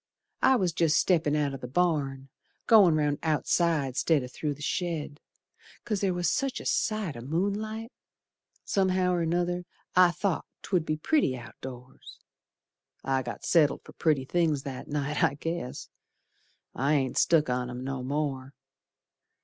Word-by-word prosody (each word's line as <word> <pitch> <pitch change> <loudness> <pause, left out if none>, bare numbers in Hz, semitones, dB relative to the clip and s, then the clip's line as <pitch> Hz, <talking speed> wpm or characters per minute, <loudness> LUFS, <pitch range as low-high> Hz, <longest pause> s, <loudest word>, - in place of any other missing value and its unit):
I 265 - +5
was 185 -7 +1
jest 160 -2 +2
steppin' 160 -5 +2
out 150 -1 +1
t' 135 - -5
th' - - -16
barn, 140 -5 0 0.4
Goin' 200 -8 +6
round 150 -1 +1
outside 155 -3 +1
'stead 150 -1 +2
o' - - -5
through 145 +3 -4
the 145 - -15
shed, 160 -5 -3 0.7
'Cause 210 -4 -1
there 195 -2 +2
was 175 -1 0
such 270 +9 0
a - - -10
sight 215 -8 0
o' 120 - -7
moonlight 205 - -2 0.7
Somehow 185 -2 +2
or 175 -1 +1
another 175 +2 0 0.3
I 180 -1 +7
thought 185 0 -2 0.2
'twould 175 -5 0
be 155 - 0
pretty 155 - +1
outdoors. 125 +1 -11 0.9
I 135 0 +1
got 120 -2 -7
settled 150 -5 +3
for - - -14
pretty 150 -5 +1
things 155 -3 +1
that 135 -2 -6
night, 150 0 -1
I 140 - +3
guess. 165 -3 -5 0.9
I 140 +4 +1
ain't 135 -3 0
stuck 160 -3 +4
on 125 0 -1
'em 125 +1 -6
no 135 -1 -3
more. 135 0 -3
155 Hz, 155 wpm, -28 LUFS, 135-180 Hz, 0.9 s, I